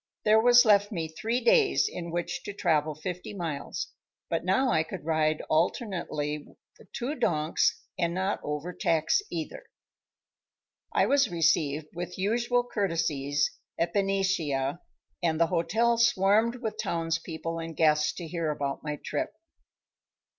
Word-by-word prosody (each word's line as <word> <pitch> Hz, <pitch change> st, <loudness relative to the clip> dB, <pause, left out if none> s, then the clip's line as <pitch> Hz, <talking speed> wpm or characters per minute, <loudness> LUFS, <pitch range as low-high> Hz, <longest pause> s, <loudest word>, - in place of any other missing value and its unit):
There 215 Hz, +1 st, +6 dB
was 245 Hz, +1 st, +7 dB
left 205 Hz, -1 st, +4 dB
me 165 Hz, -5 st, -2 dB
three 225 Hz, +10 st, -2 dB
days 460 Hz, -4 st, +4 dB
in 170 Hz, -, -6 dB
which 175 Hz, +1 st, -3 dB
to 205 Hz, -, -5 dB
travel 155 Hz, -5 st, +1 dB
fifty 180 Hz, +5 st, -6 dB
miles, 160 Hz, -6 st, -4 dB, 0.4 s
but 165 Hz, -, 0 dB
now 220 Hz, +9 st, +2 dB
I 160 Hz, -, +3 dB
could 160 Hz, 0 st, -7 dB
ride 155 Hz, -1 st, +1 dB
alternately 155 Hz, -, -1 dB, 0.3 s
the -, -, -17 dB
two 255 Hz, +4 st, -3 dB
donks 155 Hz, -, +1 dB, 0.2 s
and 170 Hz, -1 st, +1 dB
not 190 Hz, +3 st, -1 dB
overtax 155 Hz, -, 0 dB
either. -, -, -5 dB, 1.3 s
I -, -, +3 dB
was 275 Hz, -3 st, +3 dB
received 155 Hz, -3 st, +1 dB
with 175 Hz, +1 st, -6 dB
usual 235 Hz, +5 st, +1 dB
courtesies 150 Hz, -, 0 dB, 0.3 s
at 170 Hz, 0 st, 0 dB
Benicia, 190 Hz, -8 st, 0 dB, 0.4 s
and 165 Hz, -2 st, +1 dB
the 170 Hz, -, +5 dB
hotel 225 Hz, +8 st, +2 dB
swarmed 225 Hz, 0 st, +3 dB
with 215 Hz, -1 st, -3 dB
townspeople 165 Hz, 0 st, -3 dB
and 165 Hz, -1 st, -6 dB
guests 150 Hz, -1 st, +3 dB
to 170 Hz, -, -7 dB
hear 165 Hz, -1 st, -2 dB
about 140 Hz, -2 st, -2 dB
my 150 Hz, -1 st, -3 dB
trip. 315 Hz, -, -2 dB
170 Hz, 135 wpm, -28 LUFS, 155-210 Hz, 1.3 s, was